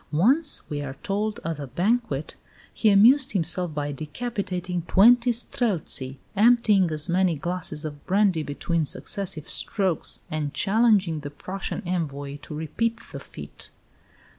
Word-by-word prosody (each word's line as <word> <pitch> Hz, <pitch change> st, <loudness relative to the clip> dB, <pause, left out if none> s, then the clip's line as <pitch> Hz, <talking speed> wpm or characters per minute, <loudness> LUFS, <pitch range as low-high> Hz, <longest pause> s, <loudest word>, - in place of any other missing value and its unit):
Once, 265 Hz, -, +3 dB
we 145 Hz, -1 st, -4 dB
are 135 Hz, -1 st, -6 dB
told, 210 Hz, +2 st, -2 dB
at 165 Hz, -2 st, -3 dB
a 140 Hz, -, -5 dB
banquet, 180 Hz, -, -1 dB, 0.4 s
he 220 Hz, -, +3 dB
"amused 235 Hz, +7 st, +5 dB
himself 175 Hz, -1 st, 0 dB
by 145 Hz, -1 st, -3 dB
decapitating 180 Hz, -, -4 dB
twenty 240 Hz, +5 st, +6 dB
Streltsy, 190 Hz, -, -1 dB, 0.2 s
emptying 210 Hz, -4 st, +4 dB
as 155 Hz, 0 st, +2 dB
many 180 Hz, -1 st, +2 dB
glasses 160 Hz, -1 st, -3 dB
of 145 Hz, -2 st, -7 dB
brandy 195 Hz, -4 st, +3 dB
between 155 Hz, +3 st, -1 dB
successive 175 Hz, +1 st, -4 dB
strokes, 190 Hz, -5 st, -1 dB
and 155 Hz, -2 st, -3 dB
challenging 200 Hz, -6 st, +3 dB
the 145 Hz, -1 st, -6 dB
Prussian 185 Hz, +7 st, -5 dB
envoy 145 Hz, -5 st, -3 dB
to 150 Hz, -, -8 dB
repeat 230 Hz, +10 st, -2 dB
the -, -, -6 dB
feat." -, -, -7 dB
180 Hz, 135 wpm, -25 LUFS, 150-215 Hz, 0.4 s, twenty